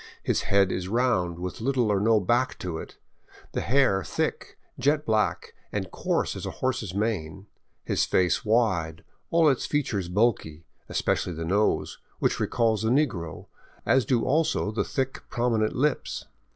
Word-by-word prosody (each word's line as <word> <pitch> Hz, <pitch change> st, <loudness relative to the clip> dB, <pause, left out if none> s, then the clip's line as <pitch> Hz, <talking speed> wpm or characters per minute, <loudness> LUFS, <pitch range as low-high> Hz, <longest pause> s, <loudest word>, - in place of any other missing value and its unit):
His -, -, +1 dB
head 100 Hz, -1 st, +4 dB
is 90 Hz, 0 st, -3 dB
round, 95 Hz, -7 st, +1 dB
with 90 Hz, +4 st, -5 dB
little 125 Hz, -3 st, +1 dB
or 100 Hz, -, +2 dB
no 110 Hz, +2 st, +4 dB
back 120 Hz, +6 st, +1 dB
to 85 Hz, -3 st, -4 dB
it, -, -, -10 dB, 0.5 s
the -, -, -2 dB
hair 120 Hz, -7 st, +2 dB
thick, -, -, -3 dB, 0.2 s
jet 145 Hz, +4 st, +2 dB
black, 110 Hz, -1 st, 0 dB, 0.2 s
and -, -, -3 dB
coarse -, -, -1 dB
as -, -, -6 dB
a -, -, -7 dB
horse's 120 Hz, -8 st, -2 dB
mane, 100 Hz, -4 st, -2 dB, 0.4 s
his -, -, +1 dB
face 90 Hz, -1 st, +2 dB
wide, 95 Hz, -8 st, +1 dB, 0.3 s
all 165 Hz, -1 st, +4 dB
its 135 Hz, -4 st, +2 dB
features 105 Hz, -11 st, -1 dB
bulky, 90 Hz, -6 st, 0 dB, 0.2 s
especially 90 Hz, -, 0 dB
the 80 Hz, +1 st, -5 dB
nose, 100 Hz, +5 st, +1 dB, 0.2 s
which -, -, 0 dB
recalls 115 Hz, -3 st, +1 dB
the 110 Hz, -, +1 dB
negro, 115 Hz, -, 0 dB, 0.4 s
as 130 Hz, -1 st, +4 dB
do 115 Hz, +1 st, +1 dB
also 155 Hz, -5 st, +1 dB
the 110 Hz, -, 0 dB
thick, 135 Hz, -1 st, -3 dB
prominent 115 Hz, -3 st, 0 dB
lips. 145 Hz, +2 st, -1 dB
110 Hz, 155 wpm, -26 LUFS, 95-130 Hz, 0.5 s, head